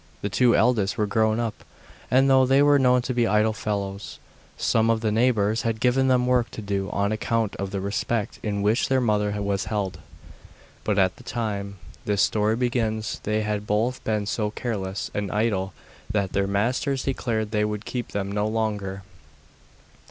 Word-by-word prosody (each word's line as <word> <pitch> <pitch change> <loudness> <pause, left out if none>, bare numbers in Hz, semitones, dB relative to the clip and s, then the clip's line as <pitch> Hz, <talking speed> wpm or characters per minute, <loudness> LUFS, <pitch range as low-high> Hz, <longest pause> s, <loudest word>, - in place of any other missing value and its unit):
The 100 - -1
two 120 +5 +3
eldest 110 -4 +2
were 105 - +2
grown 110 +1 +1
up, 115 -2 -3 0.5
and 135 +2 +4
though 135 -1 +5
they 135 +2 +4
were 145 -1 +5
known 125 -1 +4
to 130 - -2
be 120 -1 +2
idle 105 +2 +2
fellows, 100 -2 -4 0.4
some 115 0 +2
of 115 -1 +2
the 110 -2 0
neighbours 110 -2 +2
had 115 -1 -2
given 130 +3 +2
them 125 -1 +3
work 125 -1 +2
to - - -4
do 100 -1 -2
on 100 +1 0
account 110 -1 -1
of 100 0 -3
the 100 - -3
respect 105 +2 -2
in 100 -2 -2
which 105 +4 +2
their 135 0 +2
mother 105 -3 0
was 100 -2 -1
held. 95 -5 -3 0.8
But 105 -2 0
at 95 -2 +2
the - - -14
time 100 -4 -3 0.3
this 100 -2 +2
story 105 +1 +2
begins 115 -3 -1
they 110 +1 -1
had 105 -1 -2
both 115 +5 0
been 105 -2 -1
so 105 +1 -1
careless 100 -4 -4
and 105 -2 -2
idle 105 -3 0 0.4
that 100 -2 -1
their 100 0 +1
masters 125 +7 0
declared 110 -5 -2
they 105 -1 +1
would 105 0 -3
keep 125 -2 -4
them 100 -1 -3
no 105 +1 0
longer. 105 -3 -2
110 Hz, 180 wpm, -25 LUFS, 100-120 Hz, 0.8 s, though